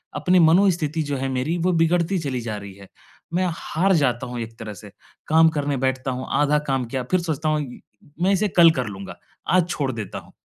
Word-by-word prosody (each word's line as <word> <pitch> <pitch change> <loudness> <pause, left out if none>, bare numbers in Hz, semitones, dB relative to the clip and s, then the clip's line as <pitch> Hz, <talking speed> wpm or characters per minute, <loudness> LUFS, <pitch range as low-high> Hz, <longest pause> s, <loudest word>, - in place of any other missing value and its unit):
अपनी 180 0 +3
मनोस्थिति 165 -2 +3
जो 145 -1 -3
है 135 +1 -2
मेरी, 130 +6 -1
वो 175 +2 +1
बिगड़ती 170 +2 +2
चली 135 -6 -3
जा 110 -2 -4
रही 100 -1 -9
है। 100 -1 -14 0.5
मैं 185 +2 +1
हार 185 +4 0
जाता 125 -7 +1
हूँ 120 0 -5
एक 115 0 -7
तरह 110 -2 -6
से, 105 +1 -12 0.4
काम 160 +1 +5
करने 145 -3 -2
बैठता 130 0 -1
हूँ, 130 +1 -4
आधा 145 0 +3
काम 135 -2 0
किया, 125 +2 -3
फिर 185 - +4
सोचता 160 -2 -2
हूँ, 155 0 +1 0.6
मैं 190 +2 +3
इसे 200 +2 +2
कल 170 -1 +9
कर 130 -6 -2
लूँगा। 100 -1 -8 0.4
आज 180 -1 +3
छोड़ 140 -6 -1
देता 110 -5 -6
हूँ। - - -18
145 Hz, 215 wpm, -23 LUFS, 125-170 Hz, 0.6 s, कल